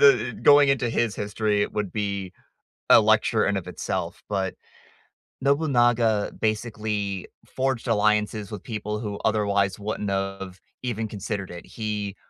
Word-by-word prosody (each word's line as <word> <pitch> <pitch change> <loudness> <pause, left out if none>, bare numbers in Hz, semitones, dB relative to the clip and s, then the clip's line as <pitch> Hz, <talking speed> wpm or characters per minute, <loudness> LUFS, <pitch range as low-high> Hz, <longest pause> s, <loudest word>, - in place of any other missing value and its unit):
the 120 -4 +5
going 145 -1 +7
into 130 -3 +2
his 115 -3 0
history, 105 0 0
it - - -3
would 105 -3 -2
be 100 -3 -3 0.6
a - - +9
lecture 110 +1 +3
in 100 - +1
of 95 - -4
itself, - - -4
but 95 -2 -1 0.9
Nobunaga 120 -7 +2
basically 105 -3 -2 0.2
forged 130 -2 -2
alliances 105 -1 +1
with 105 -3 -6
people 105 -1 -4
who 105 -3 -4
otherwise 100 -3 +1
wouldn't 105 -1 -3
of 95 -1 -3 0.2
even 115 -3 -2
considered 100 -1 -4
it. 85 -1 -9
He, 105 -3 -4
105 Hz, 135 wpm, -25 LUFS, 100-115 Hz, 0.9 s, a